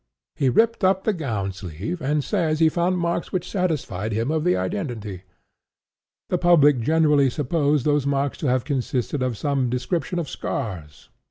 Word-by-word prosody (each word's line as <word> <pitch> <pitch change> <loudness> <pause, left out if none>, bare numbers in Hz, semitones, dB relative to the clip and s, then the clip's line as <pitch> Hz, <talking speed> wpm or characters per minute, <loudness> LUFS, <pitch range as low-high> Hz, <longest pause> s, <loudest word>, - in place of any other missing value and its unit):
He 135 - +2
ripped 225 - +2
up 190 0 +3
the 220 - +1
gown 110 - -2
sleeve, 95 - -6
and 150 +1 0
says 155 +1 0
he 160 -1 +5
found 175 +3 0
marks 170 -1 -2
which 180 -2 -2
satisfied 150 - -2
him 115 +6 -1
of 160 -1 0
the 180 +1 +2
identity. 110 - -4 1.0
The 180 - 0
public 150 -6 +5
generally 150 +1 +3
supposed 145 +1 0
those 145 -2 +2
marks 140 0 -1
to 155 - -2
have 125 -1 +1
consisted 130 -1 -2
of 125 -3 -1
some 135 -2 0
description 165 +8 -2
of 170 -3 -2
scars. 90 - -5
145 Hz, 165 wpm, -23 LUFS, 125-170 Hz, 1.0 s, he